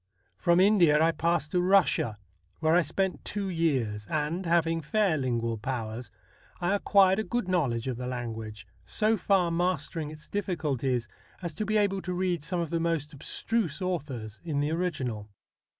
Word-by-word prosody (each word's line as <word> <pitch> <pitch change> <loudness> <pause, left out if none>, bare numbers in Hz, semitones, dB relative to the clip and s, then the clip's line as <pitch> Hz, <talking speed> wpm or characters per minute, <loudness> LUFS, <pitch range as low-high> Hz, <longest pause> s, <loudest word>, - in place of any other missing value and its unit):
From 170 -1 +3
India 185 -6 +5
I 165 +1 +4
passed 165 -1 0
to 180 - +2
Russia, 180 - +3 0.4
where 160 0 +2
I 175 - +6
spent 190 +4 -1
two 200 -1 -3
years, 130 - 0
and, 155 +4 -1
having 165 -1 +2
fair 195 +3 +1
lingual 115 -5 -1
powers, 115 -1 -4 0.5
I 175 +2 +1
acquired 195 -1 +4
a - - 0
good 240 -3 -2
knowledge 135 -11 0
of 125 -3 -2
the 125 0 -4
language, 115 -4 -5 0.2
so 220 +1 +1
far 190 -4 +2
mastering 165 -3 -1
its 155 0 -11
diffi 200 -3 -2
culties 130 -6 -1 0.4
as 170 -2 -3
to 210 +6 -3
be 215 0 +2
able 200 -2 +1
to 180 -1 -3
read 180 -4 0
some 180 +3 -2
of 165 - -4
the 170 - +1
most 165 -3 -1
abstruse 165 +3 -1
authors 140 - -4
in 155 -4 -2
the 145 +2 0
original. 135 -12 -2
165 Hz, 170 wpm, -28 LUFS, 130-185 Hz, 0.5 s, I